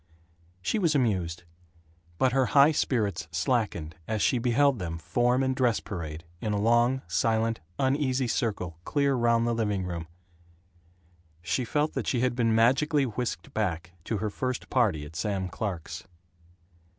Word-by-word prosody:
She 220 - 0
was 165 -6 +2
amused. 95 - 0 0.7
But 130 +5 +3
her 130 -1 +2
high 140 +3 +8
spirits 105 - 0
slackened 80 -2 -1
as 110 -1 -1
she 125 - +3
beheld 130 +2 +3
them 85 -2 -4
form 120 +10 +1
in 130 0 +1
dress 125 -4 +2
parade, 85 -6 -6 0.2
in 105 - -1
a 105 - 0
long, 120 +4 +3
silent, 115 +5 +1 0.2
uneasy 135 -1 +1
circle 95 -8 -2
clear 140 - +1
round 115 -2 +2
the 120 - +1
living 105 -5 -1
room. 85 -2 -5 1.4
She 120 +8 -1
felt 150 +5 0
that - - -3
she 120 - +1
had 125 -1 +1
been 115 -2 +2
magically 135 +6 +3
whisked 125 +3 -4
back 85 -6 -2
to 110 - -1
her 105 +1 -2
first 130 +3 -3
party, 100 - +2
at 75 +2 -12
Sam 95 +2 -1
Clark's. 90 -3 -5
115 Hz, 150 wpm, -28 LUFS, 95-130 Hz, 1.4 s, high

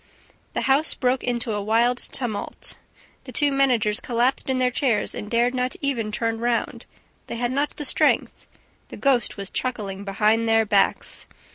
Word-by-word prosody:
The - - -1
house 280 +4 +3
broke 255 -1 0
into 240 -1 -1
a 205 -1 -1
wild 230 +4 +2
tumult. 235 -6 -3 0.5
The - - -8
two 290 -2 +2
managers 245 -6 +2
collapsed 250 +2 0
in 260 - +1
their 250 -1 +2
chairs 245 -5 0
and 210 - -6
dared 240 +2 +2
not 255 +3 -1
even 250 -8 -1
turn 225 +1 -1
round; 235 0 -1 0.4
they - - -5
had 240 +1 -1
not 285 +3 -1
the 295 - -3
strength; - - +1 0.4
the - - -9
ghost 260 -7 +2
was 195 -1 -5
chuckling 205 -6 -3
behind 215 +3 +1
their 225 0 +4
backs! 200 -2 +1
240 Hz, 165 wpm, -23 LUFS, 215-255 Hz, 0.5 s, their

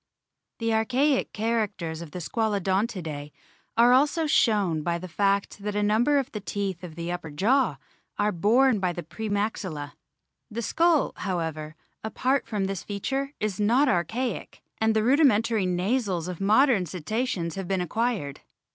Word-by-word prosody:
The 230 -1 0
archaic 260 +6 +1
characters 205 -7 -2
of 170 - -8
the 165 - -8
Squalodontidae 190 -6 -1 0.5
are 240 +2 +6
also 295 +5 +3
shown 205 - +2
by 170 +2 -1
the 185 +2 -7
fact 200 +3 0
that 205 0 -4
a 210 - +1
number 230 +8 +3
of 275 -1 -1
the 210 - -4
teeth 195 -3 -4
of 165 -3 -8
the 170 +1 -4
upper 175 -2 -5
jaw 225 - +2 0.4
are 205 +1 +2
borne 220 +6 +3
by 180 -2 0
the 175 - -6
pre 220 +7 -6
maxilla. 190 -8 -2 0.6
The 235 +1 -4
skull, 330 +3 +2
however, 160 -4 -3 0.3
apart 255 +5 0
from 210 -4 -1
this 195 -2 -3
feature, 270 +8 -3
is 210 -3 -2
not 240 +8 +3
archaic, 230 +6 -2 0.2
and 220 0 +2
the 215 - +2
rudimentary 230 -6 +3
nasals 185 -1 0
of 180 -1 -6
modern 215 -1 +4
Cetaceans 180 0 -2
have 195 -2 -5
been 190 0 0
acquired. 200 - -2
205 Hz, 155 wpm, -26 LUFS, 180-235 Hz, 0.6 s, are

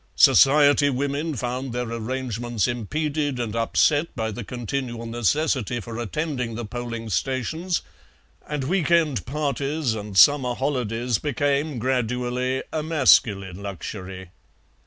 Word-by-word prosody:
Society 145 +1 +6
women 140 +4 -2
found 125 +1 -3
their 125 0 -2
arrangements 120 -1 -2
impeded 145 +4 -2
and 115 -2 -3
upset 145 +7 +2
by 110 -2 -2
the 115 +3 -6
continual 120 +1 -4
necessity 120 - 0
for 115 +1 -7
attending 125 - -3
the 120 0 -4
polling 115 0 -5
stations, 135 - -1 0.6
and 150 -2 -3
week 170 +3 0
end 160 -6 +2
parties 140 -1 -1
and 105 -2 -5
summer 125 +4 +6
holidays 125 -4 -1
became 145 0 0
gradually 125 +1 -1
a 155 - 0
masculine 105 - +3
luxury. 95 -1 -7
125 Hz, 115 wpm, -24 LUFS, 115-145 Hz, 0.6 s, Society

